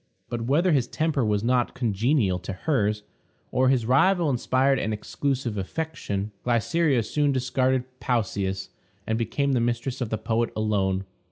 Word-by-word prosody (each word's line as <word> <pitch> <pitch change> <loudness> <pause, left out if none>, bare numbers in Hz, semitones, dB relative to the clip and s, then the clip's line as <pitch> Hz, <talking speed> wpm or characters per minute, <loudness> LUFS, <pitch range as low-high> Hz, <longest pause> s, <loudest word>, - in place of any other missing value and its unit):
But, 120 -1 -3
whether 165 +7 +3
his 135 -5 +2
temper 155 -3 0
was 105 -1 +1
not 125 0 +1
congenial 115 -3 +1
to 95 +2 -6
hers, 105 - 0 0.5
or 130 0 +3
his 130 -4 +2
rival 165 +6 +3
inspired 130 +2 +2
an 110 - -1
exclusive 125 0 -2
affection, 105 - -3
Glycera 125 +2 +2
soon 145 +6 +1
discarded 130 0 +1 0.2
Pausias, 100 -6 -1 0.4
and 110 - 0
became 120 +5 0
the 130 - +2
mistress 120 +2 -1
of 120 - -1
the 110 - -1
poet 115 +2 0
alone. 95 -3 0
120 Hz, 150 wpm, -25 LUFS, 105-135 Hz, 0.5 s, whether